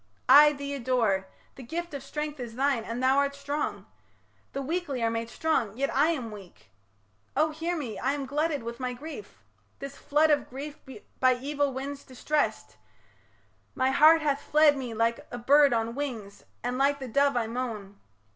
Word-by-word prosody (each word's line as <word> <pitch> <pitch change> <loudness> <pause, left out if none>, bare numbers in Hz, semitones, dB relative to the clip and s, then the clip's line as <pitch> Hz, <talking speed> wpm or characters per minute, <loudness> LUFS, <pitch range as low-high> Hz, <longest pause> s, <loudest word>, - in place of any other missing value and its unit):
I 295 +3 +8
thee 280 0 -5
adore 230 -8 0 0.3
The - - -12
gift 335 +7 -5
of 280 - -5
strength 300 +1 -5
is 235 -2 -6
thine 270 -3 +1
and 235 +3 -4
thou 265 +1 +4
art 280 0 0
strong 285 +1 -3 0.7
The 275 - -4
weakly 290 -5 -2
are 225 - +2
made 230 0 -3
strong, 235 -8 -1
yet 275 +1 -1
I 285 +3 +4
am 260 -9 -2
weak... 140 - -13 0.7
O 310 0 +3
hear 330 +3 -3
me! 250 -8 -5
I 265 +2 0
am 285 -1 -3
glutted 295 0 -1
with 235 +1 -6
my 255 -1 -2
grief 315 - -10 0.3
This 275 0 -8
flood 305 +2 +2
of 290 -1 +1
grief 285 +3 -7 0.4
by 255 -1 +4
evil 285 +2 -1
winds 275 +2 -6
distressed; 290 +3 -2 1.0
My 260 +1 +2
heart 315 +3 +6
hath 285 -2 0
fled 300 -1 +4
me 250 -4 -5
like 230 +1 0
a 245 - -6
bird 280 +3 +5
on 230 0 0
wings, 235 -8 -6 0.2
And 245 +1 -2
like 280 +1 +3
the 265 -2 -7
dove 280 +2 +2
I 235 - +1
moan. 220 -4 -5
275 Hz, 180 wpm, -28 LUFS, 235-290 Hz, 1.0 s, I